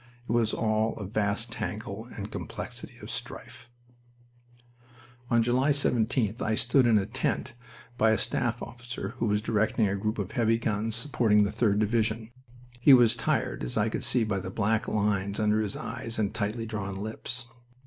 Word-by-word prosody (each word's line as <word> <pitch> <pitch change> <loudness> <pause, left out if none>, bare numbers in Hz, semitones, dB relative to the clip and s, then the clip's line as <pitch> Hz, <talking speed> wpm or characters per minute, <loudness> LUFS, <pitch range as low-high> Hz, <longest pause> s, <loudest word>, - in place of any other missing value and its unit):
It - - -3
was 115 -2 +2
all 110 0 +1
a 105 - -5
vast 105 +3 -1
tangle 110 0 -5
and 105 -1 -6
complexity - - -7
of - - -7
strife. 120 - -7 1.6
On 115 -1 +4
July 125 +4 +2
17th 120 -5 +1
I 110 - +1
stood 125 +3 +3
in 115 -2 +5
a 100 - +1
tent 125 +2 -2 0.5
by 110 - +5
a 110 - +3
staff 120 -4 -1
officer 120 +1 -6
who 115 - +1
was 105 0 +1
directing 110 0 +2
a 100 - 0
group 110 +3 -2
of 100 -1 -3
heavy 115 0 +2
guns 110 -1 -1
supporting 115 -4 +3
the 100 - 0
3d 105 -4 +2
Division. 110 +1 0 0.5
He 135 +2 +8
was 120 -3 +5
tired, - - -1
as - - -2
I - - +2
could - - -3
see 120 -2 +2
by 105 -3 -1
the 95 - -5
black 110 +3 0
lines 100 -1 0
under 105 0 +2
his 105 -2 -3
eyes 115 0 -5
and 105 -3 0
tightly 110 +3 -2
drawn 105 -3 -4
lips. 110 +4 -4
110 Hz, 175 wpm, -28 LUFS, 105-115 Hz, 1.6 s, He